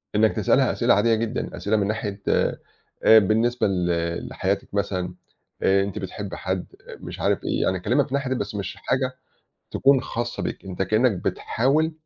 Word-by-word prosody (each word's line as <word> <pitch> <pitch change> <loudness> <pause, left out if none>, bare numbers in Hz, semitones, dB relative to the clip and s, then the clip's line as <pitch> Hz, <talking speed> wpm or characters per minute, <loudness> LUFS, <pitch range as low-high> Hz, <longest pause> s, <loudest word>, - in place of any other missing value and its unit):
إنك 110 +1 +4
تِسألها - - +3
أسئلة - - +3
عادية 110 +3 +3
جدًا 115 +2 -3
أسئلة 110 +2 0
من 100 -1 +1
ناحية 105 -2 -3
آآ، - - +1 0.6
بالنسبة 115 +4 +1
ل 90 -3 0 0.4
لحياتِك 100 +1 -2
مثلًا 90 -3 -1 0.5
آآ، 100 0 +4
أنتِ 100 +2 -4
بِتحبّي 95 -1 -6
حد؟ 95 0 -2 0.3
مش - - -8
عارف - - +1
إيه، - - 0
يعني 95 0 +1
كَلّمها 120 +10 +2
في - - -9
ناحية 140 -2 0
بس 105 -2 -4
مش 100 -3 -4
حاجة 130 -1 -1 0.6
تكون 135 -1 +4
خاصَّة 120 +1 -4
بيك - - -4
أنت 95 -1 -3
كَإنّك 110 +5 +3
بتحاوِل 135 - 0
105 Hz, 165 wpm, -24 LUFS, 95-120 Hz, 0.6 s, إنك